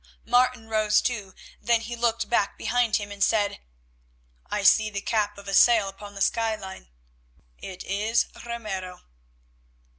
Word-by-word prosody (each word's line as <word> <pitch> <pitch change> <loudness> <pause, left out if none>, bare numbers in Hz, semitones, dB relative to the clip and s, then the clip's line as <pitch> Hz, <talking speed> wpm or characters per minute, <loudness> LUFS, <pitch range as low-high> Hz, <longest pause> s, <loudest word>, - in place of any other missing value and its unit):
Martin 245 -1 +2
rose 215 -1 +2
too. 210 -6 -3 0.3
Then 230 +1 +2
he 240 +1 -6
looked 235 -1 0
back 210 -4 0
behind 245 -3 +1
him 205 -1 -3
and 200 -1 -1
said; 205 -2 +1 0.9
"I 210 - -2
see 215 +2 +5
the 200 -1 -4
cap 205 0 -1
of 200 0 -12
a 195 - -4
sail 225 0 +5
upon 200 +1 -10
the 195 - 0
skyline. 215 -4 -2 0.7
It 185 -1 -8
is 210 +4 0 0.2
Ramiro." 210 -6 -6
215 Hz, 145 wpm, -25 LUFS, 200-230 Hz, 0.9 s, see